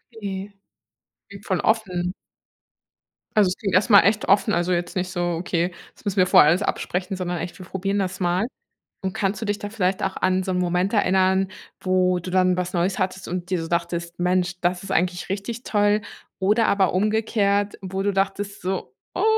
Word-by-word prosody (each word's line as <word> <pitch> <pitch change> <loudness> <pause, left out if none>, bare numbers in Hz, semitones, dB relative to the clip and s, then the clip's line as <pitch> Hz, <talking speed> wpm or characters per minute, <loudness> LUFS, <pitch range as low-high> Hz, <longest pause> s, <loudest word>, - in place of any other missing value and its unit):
Okay. 200 -2 -5 1.0
Voll 185 -3 0
offen. 185 -5 0 1.2
Also, 210 -2 +5
es 180 - -3
klingt 195 -4 -1
erst 200 +6 +3
mal 200 -2 +9
echt 205 +3 +1
offen, 210 +2 +3
also 175 +1 +1
jetzt 175 0 -2
nicht 185 -1 -1
so: 175 -1 -1
„Okay, 175 0 -1 0.2
das - - -21
müssen 200 0 -2
wir 185 - +5
vorher 150 - +7
alles 175 +5 +3
absprechen.“, 185 0 -2
sondern 180 -1 -3
echt: 170 +1 -6
„Wir 185 - -9
probieren 195 +2 -2
das 190 -1 -2
mal.“ 180 +4 +1 0.6
Und 190 -1 -2
kannst 200 -2 -1
du 225 - -3
dich 205 0 -1
da 205 - -5
vielleicht 195 -3 0
auch 190 - -1
an 185 0 +1
so 185 - -2
'n 180 - 0
Moment 180 +3 0
erinnern, 190 -2 +3 0.3
wo 185 -1 +2
du 180 +1 -6
dann 185 0 +3
was 180 0 -2
Neues 180 +4 0
hattest 190 0 -2
und 180 +1 -4
dir 185 - +1
so 165 - -5
dachtest: 170 0 -2
„Mensch, 180 0 0
das 180 +1 0
ist - - -8
eigentlich 175 +1 0
richtig 205 +5 -4
toll“? 205 0 +2 0.4
Oder 210 +4 +3
aber 195 -3 +3
umgekehrt, 205 0 +1
wo 190 0 -3
du 200 +1 +1
dachtest 195 +1 -2
so: 180 -8 -3 0.2
„Oh! 370 - 0
185 Hz, 195 wpm, -23 LUFS, 180-200 Hz, 1.2 s, mal